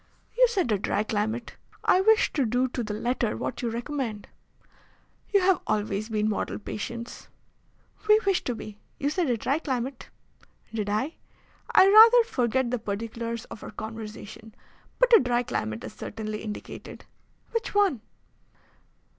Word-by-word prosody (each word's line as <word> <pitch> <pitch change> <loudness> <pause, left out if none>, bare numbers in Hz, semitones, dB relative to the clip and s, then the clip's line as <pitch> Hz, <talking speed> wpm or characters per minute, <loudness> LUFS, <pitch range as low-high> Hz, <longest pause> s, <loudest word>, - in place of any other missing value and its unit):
"You - - +6
said 385 - 0
a 205 - +2
dry 205 +1 0
climate. 220 +2 -3 0.3
I 370 - +4
wish 440 +2 +4
to 285 - +1
do 250 +2 +1
to 245 - -3
the 210 -1 -4
letter 240 0 -1
what - - -4
you 240 - -1
recommend." 235 -2 -4 1.0
"You 400 -2 +4
have 370 0 +3
always 210 +1 -1
been 215 -1 0
model 215 - -2
patients." 235 +3 -6 0.8
"We 425 0 +7
wish 390 -2 +2
to 245 - -1
be. 215 -1 -9 0.2
You 285 +1 -1
said 340 -3 0
a 240 - +1
dry 275 +7 0
climate." 260 -3 -4 0.6
"Did 210 -2 -2
I? 220 +10 -1 0.5
I 380 - +7
rather 450 +4 +9
forget 255 - 0
the 250 - -1
particulars 230 +2 -4
of - - -8
our - - -7
conversation. 220 0 -8 0.4
But - - +6
a - - +8
dry 245 -1 +1
climate 110 - -3
is - - -7
certainly 215 0 -6
indicated." 210 -1 -8 0.5
"Which 460 -2 -3
one?" 390 - +3
235 Hz, 155 wpm, -27 LUFS, 215-300 Hz, 1.0 s, rather